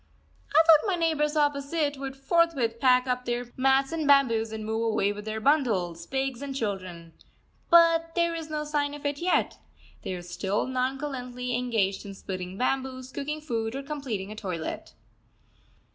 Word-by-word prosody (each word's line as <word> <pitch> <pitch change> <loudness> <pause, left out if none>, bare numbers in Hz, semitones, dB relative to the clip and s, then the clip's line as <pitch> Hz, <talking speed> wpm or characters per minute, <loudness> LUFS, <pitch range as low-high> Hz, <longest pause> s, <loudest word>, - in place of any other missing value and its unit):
I 315 +3 +5
thought 320 +4 +6
my 385 - +2
neighbours 315 -3 +1
opposite 290 +1 +1
would 270 0 -6
forthwith 270 -5 +1
pack 250 0 +4
up 250 -1 -2
their 240 0 -3
mats 270 +1 +3
and 320 -3 -2
bamboos 230 -6 +4
and 220 -1 -5
move 220 +1 -1
away 200 0 +1
with 210 0 -9
their 220 0 -3
bundles, 210 - +1
pigs, 265 -2 -2
and 280 -1 -5
children. 185 -8 -4 0.6
But 330 -1 +5
there 340 -1 +2
is 325 -1 -5
no 305 -1 -2
sign 295 -1 -1
of 295 - -11
it 285 0 -1
yet. 360 +1 +1 0.4
They 185 - -4
are 175 - -7
still 190 +3 -2
nonchalantly 255 -1 -3
engaged 225 -6 0
in 195 -1 -8
splitting 185 -1 -6
bamboos, 260 +1 -2
cooking 300 +4 -4
food, 230 -5 -3
or 275 - -4
completing 265 -9 -4
a - - -7
toilet. 180 -7 -5
260 Hz, 165 wpm, -27 LUFS, 220-295 Hz, 0.6 s, thought